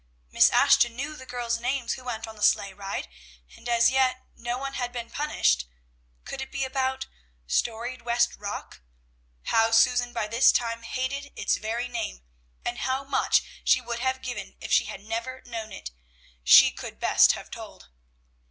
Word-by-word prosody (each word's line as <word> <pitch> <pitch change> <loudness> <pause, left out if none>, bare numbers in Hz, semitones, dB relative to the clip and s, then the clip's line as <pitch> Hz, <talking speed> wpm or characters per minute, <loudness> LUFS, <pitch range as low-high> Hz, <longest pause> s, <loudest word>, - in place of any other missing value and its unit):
Miss - - +6
Ashton 235 -1 +4
knew 285 +4 -4
the 260 -3 -12
girls' 240 -2 -2
names 250 +1 -1
who 255 - -9
went 225 -2 -4
on 220 - -10
the 210 - -14
sleigh 200 -1 +3
ride, 195 - -5 0.5
and 240 - -9
as 235 0 +4
yet 260 -1 +1
no 240 +1 -3
one 275 +1 -5
had 245 -2 -3
been 235 -1 -6
punished. 65 - +1 0.6
Could 270 - -6
it 265 - -7
be 275 -1 -1
about 265 0 -1 0.4
"Storied 235 - -1
West 235 0 +1
Rock"? 200 - -7 0.6
How 225 - +3
Susan 245 +2 +4
by 215 - -2
this 230 +4 +5
time 230 -1 -1
hated 275 +4 -4
its - - +1
very 225 +3 -3
name, - - -5 0.4
and 240 0 -3
how 265 +1 -1
much 275 -1 +2 0.2
she - - +4
would 235 -1 -5
have 260 +1 -1
given 250 -1 -6
if - - -7
she - - +4
had 195 - -8
never 235 +4 -5
known 225 -3 -6
it, 60 - -8 0.5
she - - +8
could - - -9
best - - +5
have - - -9
told. - - -10
240 Hz, 175 wpm, -26 LUFS, 225-260 Hz, 0.6 s, she